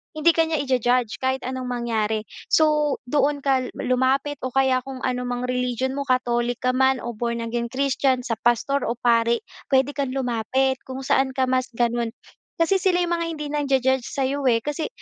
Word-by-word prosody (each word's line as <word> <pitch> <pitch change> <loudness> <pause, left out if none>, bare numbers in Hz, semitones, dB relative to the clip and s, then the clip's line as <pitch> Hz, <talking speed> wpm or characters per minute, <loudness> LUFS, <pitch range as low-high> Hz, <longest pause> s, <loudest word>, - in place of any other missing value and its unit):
hindi 310 +2 +4
ka 325 -1 +2
niya 315 -3 0
ija-judge 250 -3 +1
kahit 260 0 -1
anong 255 0 -4
mangyari. 220 -3 -1 0.2
So, 300 -2 +3
doon 285 +2 0
ka 265 -2 +2
lumapit 265 +3 0
o 255 - -3
kaya 260 0 +2
kung 260 0 -9
ano 250 -1 -1
mang 245 0 -3
religion 250 0 -1
mo, 280 +1 -4
Catholic 245 -1 +1
ka 255 - +3
man 265 0 +2
o 240 - -3
Born 235 +1 -3
Again 235 +1 -2
Christian, 260 0 0
sa 230 -3 -3
pastor 240 +4 +1
o 235 - -1
pari, 235 0 +2 0.2
puwede 265 +1 +3
kang 275 -2 -3
lumapit 260 +1 0
kung 265 +1 -6
saan 265 0 +1
ka 265 - +1
mas 255 0 +1
gano'n. 235 0 0 0.4
Kasi 335 +4 +2
sila 360 -1 +2
yung 345 - -2
mga 335 -1 0
hindi 310 -3 -5
nangja-judge 265 -3 +1
sa'yo 275 0 -1
eh. 230 -2 +3
Kasi 295 +2 -2
260 Hz, 185 wpm, -23 LUFS, 245-275 Hz, 0.4 s, hindi